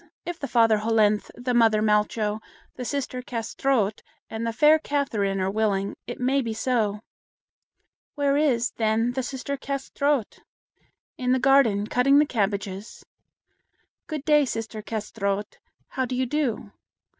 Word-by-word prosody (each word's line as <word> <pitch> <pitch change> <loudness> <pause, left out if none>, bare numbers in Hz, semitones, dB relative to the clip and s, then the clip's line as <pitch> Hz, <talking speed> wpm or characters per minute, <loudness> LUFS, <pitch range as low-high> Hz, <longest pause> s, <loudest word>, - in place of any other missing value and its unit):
if 350 -1 -5
the 280 - -4
father 225 -3 +4
Hollenthe, 215 -1 +2
the 245 +1 -2
mother 225 -3 +4
Malcho, 210 0 +1 0.3
the 255 - -6
sister 255 -1 -3
Kâsetraut, 230 -2 -1 0.3
and 225 +1 -3
the - - 0
fair 300 +6 +5
Catherine 225 -11 -1
are 190 +1 0
willing, 200 -2 0
it 240 - -6
may 265 +2 +2
be 230 -3 -4
so. 220 -4 0 1.1
"Where 285 -2 +1
is, 255 -5 +2
then, 225 +1 +1
the 260 +2 -2
sister 270 +2 -4
Kâsetraut?" 275 -2 -2 0.8
"In 250 0 +1
the 260 - +2
garden, 255 -6 +4
cutting 250 +5 +3
the 300 - +5
cabbages." 200 -3 -3 1.0
"Good 305 -3 -5
day, 295 -1 +5
sister 225 -4 -4
Kâsetraut. 205 -2 -3 0.3
How 260 - -1
do 250 0 -4
you 260 +1 0
do?" 250 -7 -2
235 Hz, 140 wpm, -25 LUFS, 215-270 Hz, 1.1 s, fair